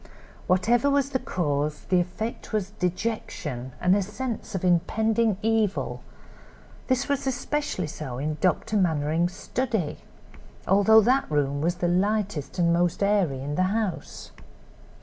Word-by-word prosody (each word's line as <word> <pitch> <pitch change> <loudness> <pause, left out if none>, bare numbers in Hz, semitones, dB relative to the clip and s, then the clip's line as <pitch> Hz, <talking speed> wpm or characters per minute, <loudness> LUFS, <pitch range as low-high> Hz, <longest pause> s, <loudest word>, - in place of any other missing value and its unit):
Whatever 230 +9 +3
was 280 -1 +1
the 260 - 0
cause, 150 -6 -1
the 185 - +4
effect 215 +7 -4
was 205 -2 -1
dejection 175 - -3
and 180 +1 +4
a 205 - +2
sense 220 +1 -5
of 190 - -3
impending 220 +4 +2
evil; 220 -3 0 0.9
this 260 +1 +1
was 280 -1 -1
especially 265 - -2
so 145 -4 -6
in 150 +3 -2
Dr. 190 +3 +1
Mannering's 165 -1 +1
study, 220 - -2 0.7
although 205 +3 +6
that 260 +5 +2
room 145 -1 0
was 170 +3 +1
the 175 0 -1
lightest 195 -3 0
and 170 -1 +3
most 175 +2 +1
airy 195 -10 +1
in 145 +1 -3
the 180 - 0 0.2
house. 210 -5 -4
185 Hz, 135 wpm, -26 LUFS, 165-220 Hz, 0.9 s, although